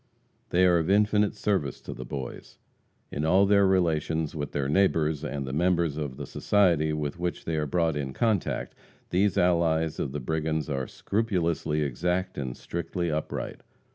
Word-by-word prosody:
They 90 +1 +4
are 90 -2 +5
of 80 +2 -1
infinite 105 +1 +3
service 85 -11 -1
to - - -7
the - - -7
Boys. 70 -3 -7 0.5
In 75 - -3
all 95 +5 +5
their 100 -1 +5
relations 80 -4 +1
with 75 -2 -4
their 70 -2 -1
neighbors 80 -3 +2
and 70 -2 -3
the 65 - -5
members 85 -1 +2
of 70 -4 -4
the 70 - -5
society 85 -3 +2
with 75 +1 -3
which 90 0 -3
they 80 - -1
are 75 -1 0
brought 80 +1 +1
in 70 -2 -3
contact, 110 - 0 0.4
these 95 +2 +2
allies 80 -3 +2
of - - -2
the 75 - -3
brigands 80 +2 -2
are 65 -2 -2
scrupulously 85 -8 -1
exact 90 +7 -1
and 65 -3 -4
strictly 85 0 -3
upright. 75 0 -4
80 Hz, 170 wpm, -27 LUFS, 75-90 Hz, 0.5 s, are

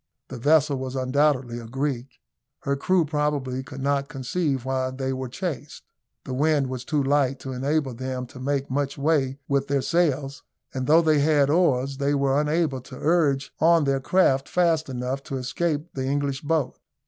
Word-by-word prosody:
The - - -7
vessel 145 +1 +3
was 130 0 -5
undoubtedly 130 -2 +1
a 115 - -9
Greek. 135 0 -3 0.4
Her 140 0 0
crew 175 +4 +2
probably 145 -4 -1
could 135 0 -9
not 140 0 0
conceive 135 0 -2
why 130 -1 -1
they 130 0 -3
were 130 -1 -4
chased. 150 0 -5 0.4
The 130 - -5
wind 145 0 +2
was 130 -1 -5
too 145 +1 0
light 135 -1 +2
to 135 - -5
enable 140 +1 -1
them 130 +1 -4
to 125 +1 -13
make 140 0 -2
much 140 +1 -1
way 140 -2 +1
with 140 0 0
their 140 -1 0
sails; 145 -5 0 0.3
and 130 -1 -3
though 165 +3 +6
they 155 -2 +3
had 145 -1 +3
oars, 140 -6 +2
they 140 +1 +1
were 140 +1 +2
unable 150 -3 0
to 130 +1 -11
urge 145 -5 +1
on 165 0 +5
their 135 -1 +1
craft 135 -2 +2
fast 165 -4 +1
enough 130 +1 -3
to 135 - -4
escape 150 +5 -2
the 130 -1 -3
English 140 -1 -1
boat. 155 -2 -1
140 Hz, 180 wpm, -24 LUFS, 130-150 Hz, 0.4 s, though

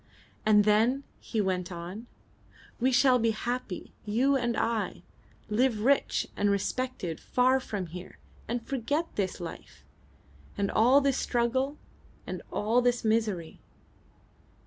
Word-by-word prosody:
"And 210 -1 +6
then," 225 +6 +3 0.2
he 225 - -3
went 185 -2 -1
on, 180 +7 -7 0.7
"we 255 +2 +3
shall 250 0 +5
be 230 0 +2
happy, 225 -2 -4
you 250 +7 +2
and 240 -3 0
I. 230 -1 -1 0.4
Live 220 0 +1
rich 275 +5 +2
and 205 - +1
respected 200 -4 -2
far 255 +1 +2
from 205 -7 -4
here, 180 +2 -9 0.3
and 235 0 -3
forget 285 +6 -2
this 190 -2 -2
life, 170 -2 -9 0.7
and 200 -1 0
all 250 +6 +5
this 275 -1 +1
struggle, 260 +4 0 0.5
and - - -5
all 225 +4 +2
this 245 -1 +1
misery!" 215 -7 0
230 Hz, 125 wpm, -29 LUFS, 205-255 Hz, 0.7 s, And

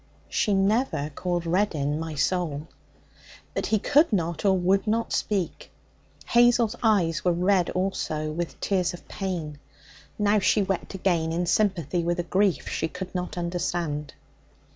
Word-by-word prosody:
She 205 - +1
never 195 - +1
called 175 +2 -2
Reddin 160 -5 0
'my 160 -1 -5
soul.' 155 -1 -1 0.9
But - - -2
he 220 - +2
could 290 +9 +3
not 170 -5 -1
or 190 -1 +4
would 190 +4 +2
not 230 +2 0
speak. 195 -5 -2 0.6
Hazel's 240 -1 +4
eyes 175 -8 +2
were 180 - +3
red 180 +1 +2
also, 155 -5 -2
with 170 +2 -4
tears 180 -3 0
of - - -16
pain. 170 -7 -4 0.6
Now 210 0 +3
she 205 +1 +3
wept 195 0 -3
again 170 -4 0
in 175 +2 0
sympathy 180 -4 +1
with 175 +1 -1
a - - 0
grief 190 +2 +1
she 160 - -1
could 185 +3 -7
not 180 -1 -4
understand. 170 -4 -2
180 Hz, 145 wpm, -26 LUFS, 165-200 Hz, 0.9 s, or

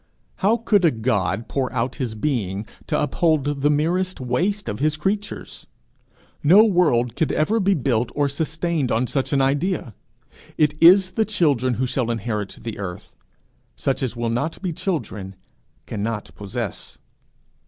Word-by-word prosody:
How 210 +4 +3
could 215 -4 +2
a 170 - +6
God 110 - -1
pour 135 -2 -2
out 125 +1 -2
his 120 -5 -3
being 105 -5 -2 0.2
to - - 0
uphold 145 -2 +1
the 145 - +3
merest 175 +5 0
waste 180 +12 -1
of 105 -1 -3
his 155 +2 +1
creatures? 200 +6 -4 0.8
No 185 +9 +7
world 150 - +2
could 160 - 0
ever 210 +9 +1
be 195 -1 +3
built 120 -4 0
or 145 -1 +2
sustained 160 -1 -1
on 115 +3 +2
such 135 +1 -2
an 135 -2 +3
idea. 145 - 0 0.6
It 150 -1 +3
is 185 +2 +7
the 220 +4 +1
children 140 - +1
who 130 +4 0
shall 125 -1 -1
inherit 105 -3 -3
the 115 -3 -6
earth; 90 -3 -7 0.6
such 135 - -1
as 125 -3 -2
will 115 -1 -1
not 140 +8 -2
be 180 -3 -1
children, 105 - -4 0.5
cannot 105 +1 -4
possess. 105 0 -6
140 Hz, 155 wpm, -22 LUFS, 115-170 Hz, 0.8 s, No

